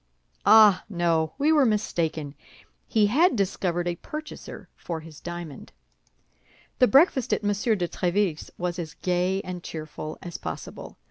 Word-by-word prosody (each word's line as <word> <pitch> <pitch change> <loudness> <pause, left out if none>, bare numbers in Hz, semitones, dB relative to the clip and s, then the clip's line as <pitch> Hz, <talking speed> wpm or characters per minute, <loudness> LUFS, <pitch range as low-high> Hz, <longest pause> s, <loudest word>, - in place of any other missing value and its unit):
Ah! 215 -4 +7
no, 170 -4 0
we 295 +3 +3
were 300 -3 +5
mistaken; 165 - -1 0.5
he 215 -2 +3
had 290 - +3
discovered 180 -3 -1
a 175 -1 -2
purchaser 305 - -8
for 165 -2 -5
his 155 -2 -12
diamond. 175 -4 -8 1.1
The 250 - +6
breakfast 270 - +4
at - - -1
M. 205 - +1
de 205 -3 0
Tréville's 180 -2 -1
was 180 0 -3
as 160 -2 -6
gay 180 +1 0
and 180 -1 -6
cheerful 155 -1 -7
as 175 -2 -7
possible. - - -7
180 Hz, 140 wpm, -26 LUFS, 170-215 Hz, 1.1 s, Ah